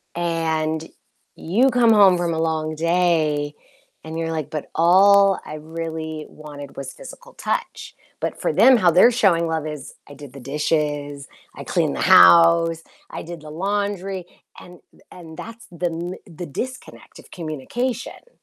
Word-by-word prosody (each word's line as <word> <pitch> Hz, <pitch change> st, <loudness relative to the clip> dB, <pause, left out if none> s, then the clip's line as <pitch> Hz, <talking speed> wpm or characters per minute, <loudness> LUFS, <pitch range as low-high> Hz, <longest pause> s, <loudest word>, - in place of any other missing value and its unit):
and 160 Hz, -2 st, -2 dB, 0.5 s
you 230 Hz, +11 st, +1 dB
come 245 Hz, -2 st, +3 dB
home 195 Hz, -4 st, +6 dB
from 175 Hz, -1 st, -1 dB
a 160 Hz, -, -2 dB
long 155 Hz, -1 st, -2 dB
day 160 Hz, -3 st, 0 dB, 0.5 s
and 160 Hz, 0 st, -7 dB
you're 165 Hz, 0 st, -2 dB
like, 155 Hz, -3 st, -4 dB
"But 155 Hz, -2 st, -6 dB
all 195 Hz, +3 st, +5 dB
I 155 Hz, -, -7 dB
really 160 Hz, 0 st, -6 dB
wanted 145 Hz, -2 st, -11 dB
was 135 Hz, -1 st, -7 dB
physical -, -, -13 dB
touch." -, -, -4 dB, 0.2 s
But -, -, -4 dB
for -, -, 0 dB
them, 260 Hz, -1 st, +6 dB
how 180 Hz, -6 st, +3 dB
they're 185 Hz, +8 st, +6 dB
showing 185 Hz, -8 st, +2 dB
love 160 Hz, -1 st, -2 dB
is, 150 Hz, -3 st, -8 dB
"I 145 Hz, -, -11 dB
did 140 Hz, -2 st, -12 dB
the 140 Hz, -, -10 dB
dishes, 145 Hz, +1 st, -2 dB, 0.3 s
I -, -, -8 dB
cleaned -, -, -1 dB
the -, -, -4 dB
house, 85 Hz, -, +6 dB, 0.3 s
I -, -, -7 dB
did 170 Hz, -1 st, -9 dB
the 155 Hz, -, -11 dB
laundry" 195 Hz, +1 st, -3 dB, 0.3 s
and 180 Hz, -1 st, -14 dB, 0.3 s
and 160 Hz, -3 st, -12 dB
that's 230 Hz, +1 st, -10 dB
the 175 Hz, 0 st, -5 dB
m 170 Hz, +2 st, -5 dB
the 175 Hz, +1 st, -8 dB
disconnect 255 Hz, -, -8 dB
of -, -, -17 dB
communication. 235 Hz, -, -5 dB
165 Hz, 155 wpm, -21 LUFS, 155-185 Hz, 0.5 s, home